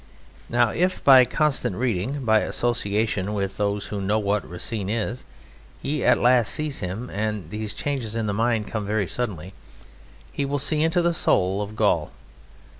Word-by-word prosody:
Now, 120 Hz, -1 st, +3 dB
if 180 Hz, +9 st, 0 dB
by 130 Hz, -2 st, +8 dB
constant 135 Hz, -, 0 dB
reading, 125 Hz, +4 st, -2 dB
by 110 Hz, -1 st, +5 dB
association 105 Hz, -4 st, -1 dB
with 100 Hz, -1 st, -3 dB
those 100 Hz, -1 st, -1 dB
who 100 Hz, -, -2 dB
know 100 Hz, +3 st, +1 dB
what 105 Hz, -1 st, -1 dB
Racine 95 Hz, +3 st, -4 dB
is, 115 Hz, +2 st, -2 dB, 0.5 s
he 150 Hz, +2 st, -2 dB
at -, -, +5 dB
last 120 Hz, -2 st, +3 dB
sees 155 Hz, -3 st, -2 dB
him 105 Hz, +6 st, -5 dB
and 105 Hz, -1 st, -3 dB
these 105 Hz, 0 st, -4 dB
changes 125 Hz, -5 st, -3 dB
in 115 Hz, -1 st, -1 dB
the 100 Hz, -, -1 dB
mind 115 Hz, 0 st, +1 dB
come 110 Hz, -1 st, -4 dB
very 105 Hz, 0 st, 0 dB
suddenly 95 Hz, -2 st, -4 dB, 0.8 s
he -, -, -2 dB
will 140 Hz, +1 st, -1 dB
see 150 Hz, +2 st, 0 dB
into 165 Hz, +2 st, +2 dB
the 170 Hz, 0 st, +2 dB
soul 95 Hz, -, +1 dB
of 105 Hz, +1 st, -6 dB
Gaul. -, -, +1 dB
110 Hz, 170 wpm, -24 LUFS, 100-125 Hz, 0.8 s, by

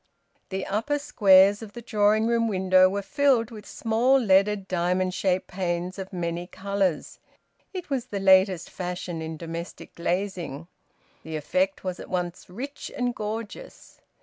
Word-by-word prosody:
The 190 Hz, 0 st, -3 dB
upper 225 Hz, +9 st, -1 dB
squares 200 Hz, -6 st, +5 dB
of 215 Hz, -2 st, -9 dB
the 240 Hz, -, -8 dB
drawing 215 Hz, 0 st, +2 dB
room 230 Hz, 0 st, +2 dB
window 185 Hz, -2 st, +4 dB
were 200 Hz, +1 st, -3 dB
filled 250 Hz, +1 st, +2 dB
with 210 Hz, -2 st, -10 dB
small 235 Hz, +4 st, +2 dB
leaded 200 Hz, -3 st, +3 dB
diamond 180 Hz, +1 st, 0 dB
shaped 185 Hz, -1 st, 0 dB
panes 180 Hz, 0 st, -3 dB
of 190 Hz, +1 st, -6 dB
many 175 Hz, -1 st, -3 dB
colours. 195 Hz, -4 st, -2 dB, 0.5 s
It 365 Hz, -6 st, -7 dB
was 255 Hz, -3 st, -1 dB
the 200 Hz, -, -4 dB
latest 190 Hz, -2 st, +4 dB
fashion 180 Hz, -2 st, -5 dB
in 160 Hz, 0 st, -5 dB
domestic 170 Hz, +1 st, -7 dB
glazing. 175 Hz, -4 st, -3 dB, 0.5 s
The 160 Hz, 0 st, -7 dB
effect 185 Hz, +6 st, -1 dB
was 185 Hz, -2 st, -4 dB
at -, -, -9 dB
once 180 Hz, -1 st, -3 dB
rich 270 Hz, +10 st, -7 dB
and 245 Hz, -1 st, 0 dB
gorgeous. 220 Hz, -, -7 dB
190 Hz, 150 wpm, -26 LUFS, 180-220 Hz, 0.5 s, squares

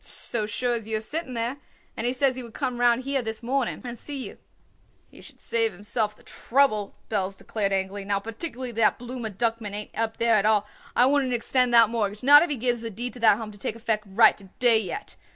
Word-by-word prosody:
"So 215 Hz, -3 st, -1 dB
sure 245 Hz, +3 st, -1 dB
as 225 Hz, -2 st, -4 dB
you 220 Hz, -1 st, 0 dB
are -, -, -3 dB
sitting 260 Hz, +4 st, -4 dB
there. 235 Hz, +4 st, -1 dB, 0.4 s
And 235 Hz, -, -2 dB
he 250 Hz, -, +1 dB
says 260 Hz, 0 st, +2 dB
he 255 Hz, -, -5 dB
would 235 Hz, -2 st, -11 dB
come 245 Hz, -1 st, -2 dB
round 240 Hz, +1 st, +3 dB
here 275 Hz, 0 st, 0 dB
this 220 Hz, 0 st, -6 dB
morning 260 Hz, 0 st, -1 dB
and 240 Hz, -2 st, -7 dB
see 290 Hz, -1 st, -5 dB
you." -, -, -13 dB, 0.7 s
"He -, -, -15 dB
should -, -, -14 dB
save 225 Hz, -1 st, 0 dB
himself 210 Hz, +3 st, -2 dB
the -, -, -22 dB
trouble," 230 Hz, -6 st, 0 dB, 0.2 s
Belz 195 Hz, -2 st, -1 dB
declared 205 Hz, -3 st, -2 dB
angrily. 195 Hz, +1 st, -2 dB
"Now 200 Hz, 0 st, 0 dB
particularly 240 Hz, +4 st, -5 dB
that 225 Hz, -1 st, +2 dB
Blooma 245 Hz, -2 st, -5 dB
Duckman 225 Hz, -3 st, -1 dB
ain't 210 Hz, 0 st, -6 dB
up 225 Hz, 0 st, -2 dB
there 230 Hz, 0 st, +3 dB
at 210 Hz, -2 st, +3 dB
all, 210 Hz, -2 st, +3 dB, 0.3 s
I 245 Hz, -, +5 dB
wouldn't 270 Hz, -2 st, +2 dB
extend 250 Hz, +1 st, +2 dB
that 230 Hz, -2 st, +7 dB
mortgage, 215 Hz, -1 st, -2 dB
not 290 Hz, +3 st, +9 dB
if 345 Hz, -, 0 dB
he 290 Hz, -, 0 dB
gives 240 Hz, -1 st, -1 dB
a 230 Hz, -, -4 dB
deed 240 Hz, +4 st, -4 dB
to 250 Hz, -, -9 dB
that 220 Hz, -3 st, +5 dB
Home 220 Hz, -2 st, -6 dB
to 205 Hz, -, -14 dB
take 215 Hz, -, -3 dB
effect 220 Hz, -2 st, -1 dB
right 220 Hz, +3 st, +5 dB
to 200 Hz, -, -13 dB
day 240 Hz, -3 st, +5 dB
yet. 190 Hz, -6 st, -6 dB
230 Hz, 235 wpm, -25 LUFS, 215-250 Hz, 0.7 s, not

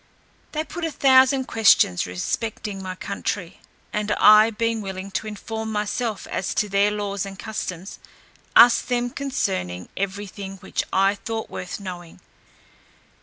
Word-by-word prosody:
They 310 Hz, 0 st, -1 dB
put 345 Hz, +2 st, -7 dB
a 325 Hz, -, 0 dB
thousand 265 Hz, -2 st, +4 dB
questions 195 Hz, -, +4 dB
respecting 200 Hz, -, -3 dB
my 185 Hz, -1 st, -5 dB
country; 195 Hz, -1 st, -4 dB, 0.3 s
and 210 Hz, 0 st, -1 dB
I 215 Hz, +1 st, +7 dB
being 230 Hz, 0 st, -1 dB
willing 190 Hz, 0 st, -6 dB
to 215 Hz, -, -3 dB
inform 220 Hz, +1 st, -5 dB
myself 215 Hz, +1 st, -2 dB
as 185 Hz, -, -2 dB
to 210 Hz, -, +1 dB
their 200 Hz, +1 st, +3 dB
laws 205 Hz, -2 st, -3 dB
and 195 Hz, -1 st, -7 dB
customs, 195 Hz, -4 st, -6 dB, 0.6 s
asked 240 Hz, +1 st, +7 dB
them 245 Hz, 0 st, 0 dB
concerning 190 Hz, -, -3 dB
every 200 Hz, +1 st, -3 dB
thing 195 Hz, 0 st, -8 dB
which 190 Hz, -, -3 dB
I 195 Hz, +1 st, +3 dB
thought 220 Hz, +2 st, -5 dB
worth 180 Hz, +2 st, -6 dB
knowing. 175 Hz, -4 st, -8 dB
205 Hz, 140 wpm, -23 LUFS, 190-225 Hz, 0.6 s, I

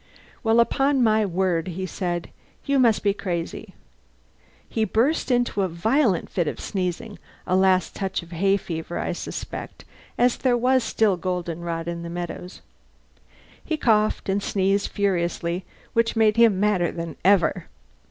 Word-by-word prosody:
"Well, 225 Hz, 0 st, +3 dB
upon 270 Hz, +3 st, +3 dB
my 215 Hz, -2 st, +3 dB
word," 180 Hz, -2 st, 0 dB
he 185 Hz, +1 st, -4 dB
said, 175 Hz, -1 st, -3 dB, 0.3 s
"you 280 Hz, -1 st, +2 dB
must 230 Hz, -4 st, +3 dB
be 200 Hz, -1 st, +3 dB
crazy." 180 Hz, -5 st, -5 dB, 0.9 s
He 220 Hz, -, -1 dB
burst 230 Hz, -, +1 dB
into 245 Hz, -5 st, +1 dB
a 190 Hz, -, +1 dB
violent 195 Hz, -, +1 dB
fit 175 Hz, -4 st, -1 dB
of -, -, -3 dB
sneezing 190 Hz, +2 st, -4 dB, 0.3 s
a 185 Hz, -, +1 dB
last 185 Hz, -1 st, +3 dB
touch 190 Hz, -3 st, -3 dB
of 170 Hz, -, -15 dB
hay 195 Hz, +4 st, +2 dB
fever, 165 Hz, -2 st, -5 dB
I -, -, -2 dB
suspect, -, -, -6 dB, 0.3 s
as 245 Hz, 0 st, +3 dB
there 250 Hz, -2 st, +2 dB
was 255 Hz, +1 st, +3 dB
still 215 Hz, -5 st, +2 dB
goldenrod 170 Hz, -2 st, -3 dB
in 170 Hz, 0 st, -4 dB
the 170 Hz, -, -6 dB
meadows. 175 Hz, +1 st, -6 dB, 1.0 s
He 315 Hz, -, -2 dB
coughed 215 Hz, -6 st, +2 dB
and 195 Hz, +1 st, 0 dB
sneezed 195 Hz, 0 st, +1 dB
furiously, 175 Hz, -2 st, -1 dB, 0.3 s
which 230 Hz, 0 st, +1 dB
made 220 Hz, -1 st, +4 dB
him 230 Hz, -5 st, +5 dB
madder 195 Hz, -4 st, +2 dB
than 165 Hz, -1 st, -6 dB
ever. 195 Hz, -2 st, +3 dB
195 Hz, 150 wpm, -24 LUFS, 175-225 Hz, 1.0 s, him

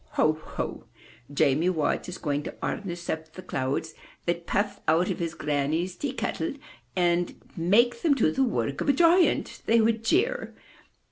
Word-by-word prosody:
Ho, 155 Hz, -, +3 dB
ho! 155 Hz, -, -6 dB, 0.5 s
Jamie 145 Hz, +4 st, +3 dB
Watt 160 Hz, 0 st, 0 dB
is 180 Hz, -, -6 dB
going 145 Hz, -2 st, -1 dB
to -, -, -7 dB
harness 175 Hz, -4 st, -4 dB
up 160 Hz, 0 st, -4 dB
the 185 Hz, -, -9 dB
clouds 140 Hz, +1 st, -2 dB, 0.3 s
that 170 Hz, 0 st, -2 dB
puff 205 Hz, +1 st, -1 dB
out 170 Hz, +5 st, +3 dB
of 180 Hz, -, -4 dB
his 170 Hz, -1 st, -3 dB
granny's 150 Hz, +5 st, -1 dB
tea 280 Hz, +7 st, -3 dB
kettle 165 Hz, -8 st, -2 dB, 0.4 s
and 175 Hz, -1 st, +1 dB, 0.2 s
make 235 Hz, +8 st, +3 dB
them 310 Hz, -4 st, +4 dB
do 215 Hz, -12 st, +3 dB
the 265 Hz, -, +1 dB
work 140 Hz, -, -1 dB
of -, -, 0 dB
a -, -, +6 dB
giant!'* 345 Hz, +5 st, +3 dB
they 230 Hz, +1 st, +5 dB
would 225 Hz, 0 st, +2 dB
jeer. 365 Hz, -, +1 dB
But -, -, -27 dB
175 Hz, 175 wpm, -27 LUFS, 155-225 Hz, 0.5 s, a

